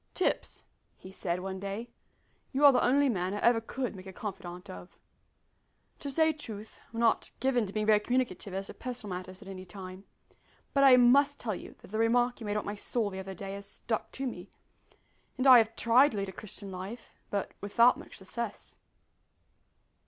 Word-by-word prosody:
"Tipps," 370 - -1 0.3
he 185 - -12
said, 180 -2 -2
one 190 0 -4
day, 200 +5 -5 0.6
"you 285 +2 +3
are 285 - +11
the 250 - +2
only 280 +3 +4
man 190 -5 -1
I - - -3
ever 235 -1 +4
could 245 0 -4
make 185 0 -10
a - - -7
confidant 185 -2 -7
of. 185 -1 -10 1.0
To 285 - -5
say 315 +3 +3
truth 220 -8 -9
I'm 230 - -5
not 230 -1 +2
given 250 -5 +1
to - - -7
being 215 +1 -1
very 215 -1 +5
communicative 235 -4 -1
as 195 +1 -3
to - - -8
personal 240 -7 -5
matters 185 +2 -8
at - - -14
any 190 -1 -7
time, 185 0 -9 0.7
but 275 - +4
I 260 -2 +9
must 280 +4 +5
tell 220 -3 -2
you - - -9
that - - -13
the 215 +2 -3
remark 240 +2 +2
you 225 - -6
made 205 - 0
about 210 - -2
my 205 - -3
soul 210 +1 -2
the 190 - -6
other 190 0 -6
day 195 +2 -6
has 200 0 -7
stuck 220 -2 -3
to 270 - -3
me, 250 - -6 0.9
and 255 - -1
I 255 -2 +10
have 225 0 0
tried 245 +5 +5
to - - -4
lead 195 -1 -2
a - - -5
Christian 200 0 -8
life, 195 +6 -7 0.2
but 200 -1 -2
without 235 +5 +5
much - - -11
success." 210 +3 -6
215 Hz, 200 wpm, -30 LUFS, 195-245 Hz, 1.0 s, are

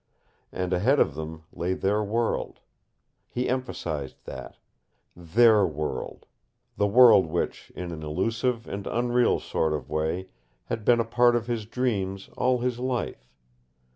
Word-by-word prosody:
And 90 0 -2
ahead 120 +11 +3
of 75 - +3
them 80 +1 -7
lay 90 +2 -1
their 105 +3 +1
world. 115 +3 -1 0.7
He 125 - -2
emphasized 85 - -3
that. - - -8 0.6
THEIR 105 +4 +4
world 75 -1 -5 0.5
the 105 - +2
world 110 -4 +7
which, 85 +2 -3
in 90 -1 -5
an 80 -2 -7
illusive 115 +10 -1
and 100 0 -5
unreal 120 0 +2
sort 80 -1 -1
of 75 - -5
way, 80 +4 -1 0.4
had 110 - -4
been 120 +2 +4
a 115 - +1
part 120 +1 +4
of 120 -1 0
his 115 -3 -3
dreams 100 -6 -2
all 125 -1 +1
his 125 -1 -1
life. 125 - -3
105 Hz, 140 wpm, -26 LUFS, 85-120 Hz, 0.7 s, world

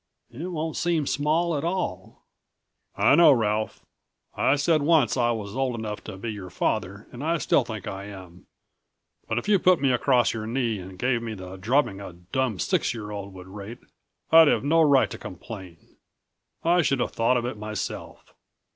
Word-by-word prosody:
"It 150 +9 -6
won't 160 -3 -3
seem 165 -3 +1
small 155 +5 +1
at 140 - -2
all." 170 - -3 0.7
"I - - +4
know, 165 0 +7
Ralph. 110 -4 0 0.5
I 135 - +3
said 155 +2 +2
once 150 -3 +3
I 120 -2 +2
was 105 -3 -3
old 130 -2 0
enough 105 -2 -5
to 95 - -7
be 115 +3 -4
your 100 -4 -8
father 100 +4 -2
and 125 +3 -8
I 165 +2 +1
still 140 - +2
think 110 -4 -7
I 95 +1 -6
am. 95 -3 -12 0.8
But - - -1
if - - -2
you 205 -2 +4
put 180 0 +4
me 135 -2 +2
across 125 0 +2
your 110 -1 -5
knee 115 -3 -1
and 95 0 -10
gave 125 +3 0
me 115 -2 -5
the 95 -1 -9
drubbing 100 +1 0
a 95 - -8
dumb 100 +7 -2
six 115 - 0
year 105 -2 -6
old 100 -1 -6
would 90 -1 -10
rate 100 +4 -9 0.5
I'd 160 -1 +8
have - - +2
no 165 +3 +3
right 135 -9 +4
to - - -7
complain. 90 -2 -10 0.7
I 175 +2 +4
should 135 -4 +1
have 125 - -1
thought 115 +2 +2
of 120 - -2
it 125 -2 -4
myself." 105 -1 -6
120 Hz, 190 wpm, -25 LUFS, 100-145 Hz, 0.8 s, I'd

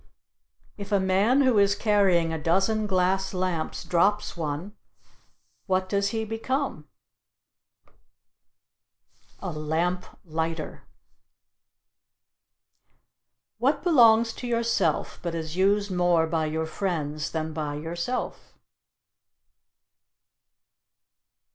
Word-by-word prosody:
If 200 +1 -7
a 200 - +4
man 195 +8 +3
who 255 -6 +4
is 200 0 +4
carrying 195 -7 +2
a 160 - -4
dozen 195 +7 +1
glass 190 0 +1
lamps 180 -3 -2
drops 185 +4 +1
one, 165 +5 -4 0.9
what 185 -1 +1
does 200 +1 0
he 220 -1 -2
become? 225 - -3 2.5
A - - -4
lamp 160 +4 -1 0.2
lighter. 160 -1 -4 2.7
What 280 +3 +1
belongs 230 -8 +5
to 245 - -7
yourself, 230 -9 0
but 170 -1 -3
is 160 -1 -5
used 200 +2 +2
more 175 -2 +3
by 160 -1 -1
your 160 +1 -2
friends 155 -4 -3
than 160 -1 -3
by 150 -2 -3
yourself? 170 +10 -4
185 Hz, 90 wpm, -26 LUFS, 160-210 Hz, 2.7 s, belongs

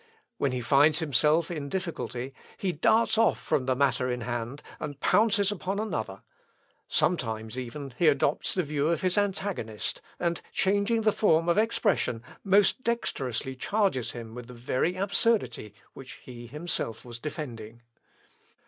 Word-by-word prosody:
When 140 - +1
he 125 -1 -2
finds 145 +5 +4
himself 155 +2 +2
in 150 -4 -4
a - - -7
difficulty 140 -8 -4 0.2
he 190 - -1
darts 220 +6 +3
off 225 - +3
from 130 -2 -1
the 130 - +2
matter 130 -1 +1
in 125 0 -2
hand, 120 +4 -4 0.2
and 145 -2 -6
pounces 205 +2 +3
upon 195 0 -3
another; 110 - -3 0.6
sometimes, 110 -9 0
even, 130 +2 -6
he 170 - +4
adopts 145 0 +2
the 185 - +1
view 145 -1 -1
of 170 +1 0
his 185 -1 +2
antagonist, 195 - -1 0.2
and 170 -1 -1
changing 200 +4 +2
the 215 0 +3
form 165 -6 +3
of 170 +4 +3
expression, 205 - +1 0.2
most 200 +5 +4
dexterously 135 - -2
charges 190 - 0
him 115 -2 -8
with 125 0 -8
the 125 - -11
very 130 +8 -1
absurdity 195 - +1 0.2
which 130 -1 -10
he 120 -1 -10
himself 145 -5 -3
was 120 -1 -8
defending." 120 -6 -7
150 Hz, 150 wpm, -28 LUFS, 125-195 Hz, 0.6 s, finds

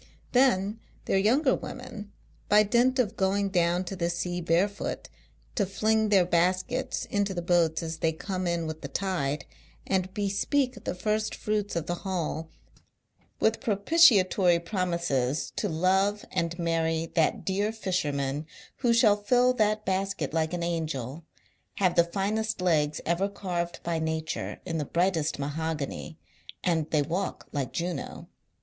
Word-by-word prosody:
Then, 225 -5 +3 0.3
their 195 - +2
younger 260 +7 +3
women, 230 -5 -7 0.4
by 210 +1 +6
dint 245 +5 +3
of 230 -4 +1
going 195 0 +1
down 175 -1 +2
to 195 - -5
the 170 -2 -1
sea 175 +1 -2
barefoot, 175 +5 0 0.4
to - - +1
fling 215 +3 +1
their 195 -3 +5
baskets 185 +10 0
into 200 -1 -1
the 175 - -2
boats 170 -2 +2
as 160 0 -4
they 160 - +2
come 185 +3 -4
in 170 -1 0
with 155 0 -5
the - - -5
tide, 150 -7 -2 0.4
and 185 -1 0
bespeak 215 +5 -1
the - - -2
first 215 +3 -1
fruits 210 -2 -2
of 170 -2 -1
the 175 - -2
haul 165 -4 -3 0.9
with 220 0 +2
propitiatory 200 - +5
promises 170 - -1
to 210 - 0
love 190 +5 +1
and 170 0 -1
marry 165 -1 0
that 160 - +1
dear 200 +3 0
fisherman 150 -8 -2 0.3
who 240 -1 +2
shall 230 -3 +5
fill 245 +4 +3
that 215 -2 +1
basket 190 -6 -1
like 160 -1 +1
an 175 -1 -2
Angel, 155 -3 -3 0.5
have 185 -3 +2
the 170 - +5
finest 210 +5 -1
er 165 +3 +1
carved 175 -3 -4
by 170 -1 -1
Nature 160 0 -3
in 165 -3 -2
the - - 0
brightest 170 0 0
mahogany, 155 +2 -4 0.5
and 160 -3 +1
they 150 -2 +2
walk 175 +6 -3
like 140 -5 -2
Juno. 175 +1 -4
180 Hz, 145 wpm, -28 LUFS, 165-205 Hz, 0.9 s, by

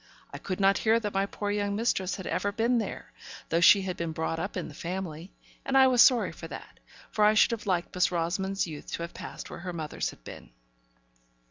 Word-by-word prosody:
I - - -6
could 185 -1 -4
not 195 0 +4
hear 225 +1 +3
that 210 -3 -4
my 195 +1 +1
poor 205 0 -4
young 205 -1 -1
mistress 200 -4 0
had 190 - -8
never 205 - -1
been 235 +3 +1
there, 220 - -6 0.4
though 165 +1 +1
she 195 +3 +7
had 185 -1 -4
been 165 -1 -3
brought 160 0 -2
up - - -4
in - - -3
the 150 - -11
family; 175 +1 -6 0.3
and 270 0 +1
I 265 - +8
was 250 -2 +5
sorry 250 -4 +5
for - - -9
that, - - -10 0.3
for 215 - +1
I 210 +1 +5
should 215 - +5
have 230 -3 -4
liked 180 -2 -1
Miss 180 0 +2
Rosamond's 190 +3 -1
youth 155 -4 -9
to 170 - -3
have 170 - -7
passed - - -8
where - - -7
her 180 0 -6
mother's 155 -3 -3
had - - -14
been. - - -11
195 Hz, 230 wpm, -28 LUFS, 170-210 Hz, 0.4 s, I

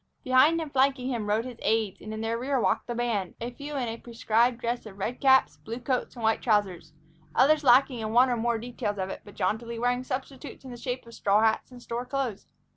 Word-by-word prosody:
Behind 265 +6 +4
and 315 -3 -6
flanking 265 -1 +2
him 225 -4 -2
rode 220 +3 +1
his 250 -2 -8
aides, 220 -3 0
and 215 - -7
in 220 0 -5
their 225 +1 -1
rear 260 +3 -1
walked - - 0
the 240 - -3
band, 230 -6 -1
a 235 +2 -4
few 285 +4 -7
in 255 -3 -1
a 225 0 -4
prescribed 235 +1 +1
dress 235 -1 -3
of 195 -2 -12
red 220 +5 -4
caps, 265 -1 +4
blue 230 +2 -7
coats, 255 +1 -2
and 235 - -8
white 220 0 +2
trousers, 200 -8 0 0.4
others 295 +4 +4
lacking 255 -1 +5
in 215 -1 -3
one 245 +3 +5
or - - +2
more 235 0 0
details 225 -3 -4
of 190 -1 -3
it, - - -7
but 205 - -14
jauntily 230 +2 -2
wearing 245 +2 0
substitutes 260 +1 -6
in 260 - -8
the 240 - -8
shape 245 +1 -4
of 230 - -13
straw 205 0 +2
hats 220 0 +1
and 245 -1 -12
store 240 +1 -4
clothes. 265 -7 -3
240 Hz, 235 wpm, -27 LUFS, 220-255 Hz, 0.4 s, lacking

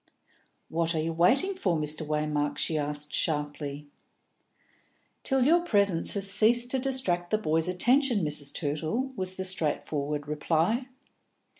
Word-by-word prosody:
"What 165 +1 -1
are - - 0
you 165 +1 -2
waiting 245 - +3
for, 185 - -1
Mr. 155 +1 -1
Waymark?" 150 -1 -1
she 160 - -1
asked 150 0 -4
sharply. 145 -2 -2 1.4
"Till 265 -2 +1
your 335 +5 +5
presence 200 - +2
has 200 -1 0
ceased 235 +5 +4
to 265 - +1
distract 250 -10 0
the 215 - +2
boys' 160 -5 0
attention, 240 - +2
Mrs. 150 -1 -1
Tootle," 160 - -2
was 185 -2 -3
the 190 - -4
straightforward 150 -4 -1
reply. 165 - 0
170 Hz, 135 wpm, -28 LUFS, 150-220 Hz, 1.4 s, your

